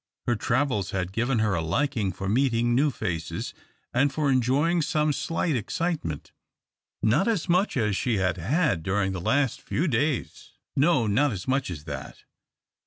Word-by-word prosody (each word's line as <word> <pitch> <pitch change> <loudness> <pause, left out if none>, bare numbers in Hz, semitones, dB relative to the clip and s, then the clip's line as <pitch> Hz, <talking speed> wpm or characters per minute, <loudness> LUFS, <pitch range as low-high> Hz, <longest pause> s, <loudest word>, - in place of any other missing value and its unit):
Her 120 - +2
travels 120 -3 0
had 95 -1 -2
given 120 +4 0
her 110 -2 +2
a 85 - 0
liking 105 - 0
for 95 +2 -5
meeting 120 +1 +2
new 140 +5 +3
faces, 90 - -4 0.4
and 135 +3 +3
for 145 0 +1
enjoying 140 +7 +2
some 150 0 +1
slight 165 +1 -1
excitement. 125 - -3 0.7
Not 140 - +3
as 215 -8 0
much 180 -1 +2
as 105 -4 +1
she 115 +1 0
had 95 -1 0
had 100 - +1
during 95 +2 0
the 95 -2 -4
last 135 +5 +1
few 170 +6 -1
days 145 0 -1 0.2
no, 140 -4 +3
not 125 +7 +2
as 95 -5 -6
much 135 -2 0
as 80 -5 -6
that. 70 -3 -7
120 Hz, 165 wpm, -26 LUFS, 95-145 Hz, 0.7 s, new